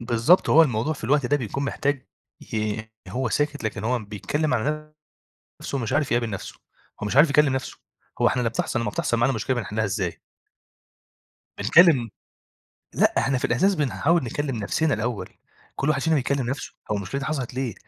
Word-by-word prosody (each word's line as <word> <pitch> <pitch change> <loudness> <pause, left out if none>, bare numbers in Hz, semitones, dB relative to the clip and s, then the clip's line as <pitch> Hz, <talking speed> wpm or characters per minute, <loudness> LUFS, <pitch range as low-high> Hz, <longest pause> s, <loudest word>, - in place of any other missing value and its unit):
بالضبط، 120 +9 +3
هو 165 - +8
الموضوع 125 +1 0
في 140 - -8
الوقت 140 +2 +2
ده 145 - +2
بيكون 135 +2 -3
محتاج 140 -1 -1 0.5
ي 110 0 -1 0.3
هو 120 +6 -2
ساكت 145 0 -1
لكن 110 - -3
هو 125 +1 +1
بيتكلم 115 +8 -2
عن 155 +5 -2 0.7
نَفسه، 140 - -3
مش 120 -1 -3
عارف 145 -1 +1
يقابل 120 -1 +1
نَفسه، 100 -3 -6 0.5
هو - - -1
مش 105 - -3
عارف 150 +3 +7
يكلم 145 -1 +4
نَفسه، 130 +1 -4 0.4
هو - - +5
إحنا 125 - +1
لمّا 115 - +1
بتحصل 115 +1 -2
لمّا 105 - -1
بتحصل 120 - 0
معانا 120 +3 +2
مشكلة 115 +3 -1
بنحلها 110 -1 -2
إزاي؟ 95 -3 -3 1.4
بنكلم 155 -10 +5 0.9
لأ - - +3
إحنا 135 -2 +1
في - - -6
الإحساس 190 +12 +3
بنحاول 155 +1 +1
نكلم 135 +1 -3
نَفسنا 145 +9 0
الأول، 110 +1 -3 0.5
كُلّ 140 - -1
واحد 140 -3 +2
فينا 160 0 +2
بيكلم 135 -2 0
نَفسه 135 - -5 0.2
هو 105 - +1
المشكلة 100 +6 -4
دي - - -4
حصلت 135 -6 -3
ليه، 130 -4 -2
130 Hz, 180 wpm, -24 LUFS, 115-145 Hz, 1.4 s, هو